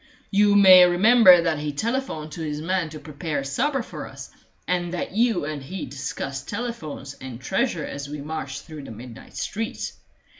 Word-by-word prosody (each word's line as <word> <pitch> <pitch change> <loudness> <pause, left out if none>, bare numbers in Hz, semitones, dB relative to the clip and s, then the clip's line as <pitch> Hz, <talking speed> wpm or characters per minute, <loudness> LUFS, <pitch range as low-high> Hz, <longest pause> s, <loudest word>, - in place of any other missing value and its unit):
You 205 0 +4
may 190 -2 +9
remember 185 0 +7
that 160 -3 0
he 150 0 -3
telephoned 220 - -3
to 165 - -7
his 150 -2 -3
man 175 +1 -1
to 155 0 -9
prepare 150 0 -4
supper 260 - 0
for - - -8
us, - - -10 0.4
and 175 -1 0
that - - -3
you 225 -5 +1
and 150 -1 -4
he 155 +4 -6
discussed 135 0 -5
telephones 200 - -5
and 130 -3 -7
treasure 190 - -1
as 140 0 -6
we 150 0 -6
marched 140 -2 -5
through 155 -3 -9
the - - -9
midnight 115 +1 -11
streets. 225 +3 -4
160 Hz, 175 wpm, -24 LUFS, 145-200 Hz, 0.4 s, may